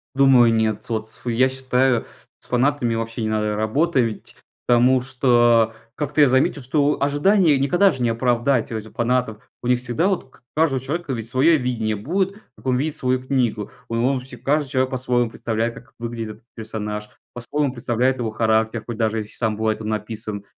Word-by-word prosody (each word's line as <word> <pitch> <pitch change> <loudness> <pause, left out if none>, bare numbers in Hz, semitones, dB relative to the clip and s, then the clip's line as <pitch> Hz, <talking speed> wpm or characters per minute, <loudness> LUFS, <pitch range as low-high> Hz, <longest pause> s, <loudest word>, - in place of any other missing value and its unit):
Думаю, 130 -4 +6
нет. 110 -1 0
Вот 110 -1 -3
с 115 0 -13
я 125 +2 +2
считаю, 130 -2 +1 0.3
с - - -17
фанатами 125 -2 +1
вообще 115 +1 -4
не 110 - -1
надо 105 -1 0
работать, 115 +2 0 0.3
потому 125 +1 +4
что 120 -3 +3 0.2
как-то 150 +1 0
я 145 - +7
заметил, 130 +2 +2
что 145 +3 +1
ожидания 150 +3 +3
никогда 175 +9 +3
же 130 -4 -6
не 120 - +2
оправдать 120 +2 +1
у 110 - -2
этих 110 0 -9
фанатов. 120 -2 -1
У 120 - -5
них 125 0 +3
всегда 125 +8 0
вот 195 -3 0
у - - -23
к - - -24
каждого 150 -4 +2
человека 145 +2 -3
ведь 115 -2 -5
свое 145 +7 +4
видение 120 -5 -1
будет, 185 - -1 0.2
как - - -19
он 130 -1 +2
видит 150 +3 -1
свою 130 0 -1
книгу. 120 -6 -1 0.2
Ой, 115 0 -1
он 130 +3 +1
все 125 0 -9
каждый 140 +4 0
человек 130 0 0
по-своему 125 -2 0
представляет, 115 +1 -2
как 125 - -14
выглядит 115 -1 -5
этот 115 - -29
персонаж, 105 -1 -5 0.2
по-своему 135 +4 -1
представляет 125 +1 0
его 115 -3 -2
характер, 110 0 +1
хоть 120 -2 -6
даже 110 -1 0
если 105 -1 -7
сам 110 -2 -1
бывает 110 0 -1
он 110 - -4
написан. 110 -1 -4
120 Hz, 190 wpm, -22 LUFS, 110-135 Hz, 0.3 s, я